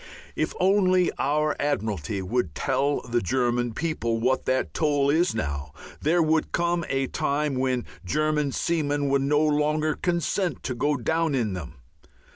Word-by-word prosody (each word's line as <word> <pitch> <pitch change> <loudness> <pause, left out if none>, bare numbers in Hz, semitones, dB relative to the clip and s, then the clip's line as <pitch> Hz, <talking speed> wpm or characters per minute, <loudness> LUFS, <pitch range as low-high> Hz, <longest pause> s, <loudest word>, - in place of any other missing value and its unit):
If - - -1
only 185 -1 +3
our 150 +2 +1
Admiralty 105 - -2
would 95 -5 -1
tell 140 +1 0
the 120 -1 -1
German 120 +3 0
public 160 -1 -2 0.2
what 130 +1 +1
that 130 0 0
toll 145 -3 +2
is 170 +1 +2
now, 70 -7 -3 0.3
there 165 +3 +3
would 155 0 +1
come 175 0 0
a 135 0 +1
time 145 +2 -1
when 130 -1 0 0.2
German 150 +6 0
seamen 145 -2 0
would 140 0 +2
no 145 +2 +2
longer 150 +1 +1
consent 175 +1 -1
to 130 - -2
go 145 +4 0
down 160 +4 0
in 110 -6 0
them. 80 -3 -7
145 Hz, 150 wpm, -25 LUFS, 125-155 Hz, 0.3 s, only